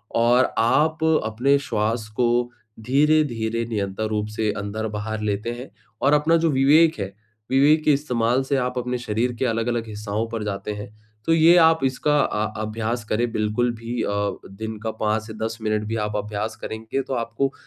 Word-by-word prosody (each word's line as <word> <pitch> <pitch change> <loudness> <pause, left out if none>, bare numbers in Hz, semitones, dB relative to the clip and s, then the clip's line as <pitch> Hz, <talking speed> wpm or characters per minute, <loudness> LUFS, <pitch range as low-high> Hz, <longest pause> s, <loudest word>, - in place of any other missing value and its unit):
और 120 +2 +3
आप 155 +7 +2 0.2
अपने 125 +6 +2
श्वास 110 -3 -1
को 120 0 +2 0.6
धीरे-धीरे 125 -5 +2
निरंतर 105 0 -2
रूप 105 -1 -1
से 110 -1 +1
अंदर-बाहर 105 +1 -4
लेते 105 +2 -2
हैं 130 - -8 0.3
और 140 +2 +4
अपना 150 +3 +4
जो 165 0 +2
विवेक 145 +2 +4
है, 95 0 -4 0.4
विवेक 150 +4 +4
के 150 - +5
इस्तेमाल 125 -3 +1
से 140 +1 -1
आप 125 0 -2
अपने 125 0 -1
शरीर 120 +1 -1
के 130 - +1
अलग-अलग 115 0 -1
हिस्साओं 105 +1 -3
पर 115 -2 -4
जाते 100 0 -4
हैं। 105 0 -7 0.4
तो 165 - +3
ये 165 +2 +6
आप 160 0 +5
इसका 150 +3 +1
अ 105 +1 0 0.2
अभ्यास 115 +2 -3
करें 115 +2 0
बिल्कुल 110 +3 0
भी 115 +1 -4
अ, - - -1 0.4
दिन 110 +3 -6
का 110 - -1
5-10 110 +1 -2
मिनट 110 0 0
भी 115 - -2
आप 105 0 -4
अभ्यास 105 +1 -3
करेंगे, 110 +4 -3
तो 135 - -5
आपको 120 +3 -1
115 Hz, 170 wpm, -23 LUFS, 110-135 Hz, 0.6 s, ये